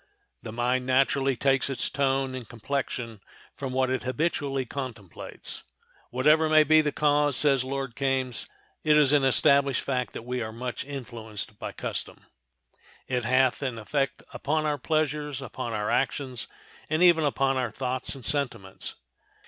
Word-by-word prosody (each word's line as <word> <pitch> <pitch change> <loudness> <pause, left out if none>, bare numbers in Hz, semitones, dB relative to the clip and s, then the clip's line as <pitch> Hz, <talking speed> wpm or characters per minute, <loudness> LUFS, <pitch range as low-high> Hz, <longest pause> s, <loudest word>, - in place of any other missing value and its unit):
The - - -7
mind 125 +2 0
naturally 135 +1 +3
takes 135 +2 +2
its 135 - -1
tone 135 -1 0
and 125 -4 -7
complexion 120 -3 -4 0.3
from 135 -2 -4
what 130 0 +1
it 130 - 0
habitually 135 -1 -1
contemplates. 120 - -7 0.5
"Whatever 155 +5 +4
may 155 0 +7
be 155 +1 +6
the 150 -1 0
cause," 145 -1 +2
says 135 -4 +4
Lord 135 -2 -4
Kames, 130 -3 -1 0.4
"it 150 -1 +5
is 145 -2 +5
an 145 -2 +4
established 140 +1 +4
fact 125 -2 -2
that - - -6
we 125 0 -2
are 110 -1 -4
much 120 +2 -4
influenced 110 -6 -7
by - - -4
custom. - - -5 0.8
It 125 -2 -1
hath 130 +2 +3
an 130 -4 -2
effect 135 +5 -2
upon 155 +2 -1
our 150 -1 0
pleasures, 150 -1 -1
upon 130 -3 -5
our 105 -1 -1
actions, 130 -2 -1 0.4
and 155 +3 +2
even 170 -3 +6
upon 135 -2 +1
our 125 -2 0
thoughts 125 +4 -3
and 130 -4 -9
sentiments." 120 -10 -2
135 Hz, 155 wpm, -27 LUFS, 125-145 Hz, 0.8 s, may